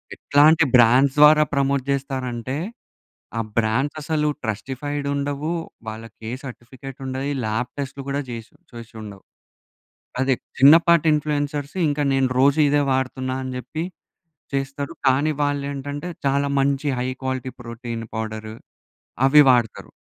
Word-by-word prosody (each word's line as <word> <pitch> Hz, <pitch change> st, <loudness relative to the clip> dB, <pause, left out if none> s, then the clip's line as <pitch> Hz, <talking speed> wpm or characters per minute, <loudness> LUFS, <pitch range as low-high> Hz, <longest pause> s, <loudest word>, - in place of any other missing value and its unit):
ఎట్లాంటి 155 Hz, +3 st, +4 dB
బ్రాండ్స్ 125 Hz, +3 st, +5 dB
ద్వారా 150 Hz, +1 st, +8 dB
ప్రమోట్ 140 Hz, -1 st, +1 dB
చేస్తారంటే. 130 Hz, -2 st, -3 dB, 0.8 s
ఆ -, -, +2 dB, 0.2 s
బ్రాండ్స్ 120 Hz, +7 st, +1 dB
అసలు 150 Hz, 0 st, 0 dB, 0.2 s
ట్రస్టిఫైడ్ 135 Hz, +6 st, -4 dB
ఉండవు. 140 Hz, +2 st, -2 dB, 0.4 s
వాళ్ళకి 110 Hz, 0 st, -10 dB
ఏ -, -, -4 dB
సర్టిఫికేట్ 130 Hz, +1 st, -10 dB
ఉండయి. 135 Hz, +2 st, -3 dB
లాబ్ 110 Hz, +3 st, -2 dB
టెస్ట్‌లు 140 Hz, 0 st, -5 dB
కూడా 140 Hz, +1 st, -1 dB
చేసి 115 Hz, -1 st, -8 dB, 0.2 s
చేసి 115 Hz, 0 st, -10 dB
ఉండవు. 100 Hz, -2 st, -10 dB, 1.0 s
అదే 130 Hz, 0 st, +3 dB, 0.2 s
చిన్నపాటి 165 Hz, +4 st, +6 dB
ఇన్‌ఫ్లుయెన్సర్స్ 145 Hz, 0 st, -2 dB
ఇంకా 145 Hz, 0 st, -1 dB
నేను 135 Hz, -1 st, +2 dB
రోజు 140 Hz, +3 st, +4 dB
ఇదే 145 Hz, 0 st, +3 dB
వాడుతున్నా 130 Hz, 0 st, -1 dB
అని 130 Hz, -, -5 dB
చెప్పి 155 Hz, +5 st, -5 dB, 0.7 s
చేస్తారు. 140 Hz, +2 st, -3 dB
కానీ 135 Hz, +4 st, +3 dB
వాళ్ళు 145 Hz, -1 st, 0 dB
ఏంటంటే 145 Hz, +4 st, -5 dB, 0.2 s
చాలా 140 Hz, +1 st, +1 dB
మంచి 140 Hz, +1 st, 0 dB
హై 125 Hz, -, -1 dB, 0.2 s
క్వాలిటీ 130 Hz, 0 st, -3 dB
ప్రోటీన్ 115 Hz, -1 st, -6 dB
పౌడర్ 110 Hz, 0 st, -5 dB, 0.7 s
అవి 150 Hz, +2 st, +8 dB
వాడతారు. 120 Hz, -4 st, +1 dB
135 Hz, 125 wpm, -22 LUFS, 125-145 Hz, 1.0 s, ద్వారా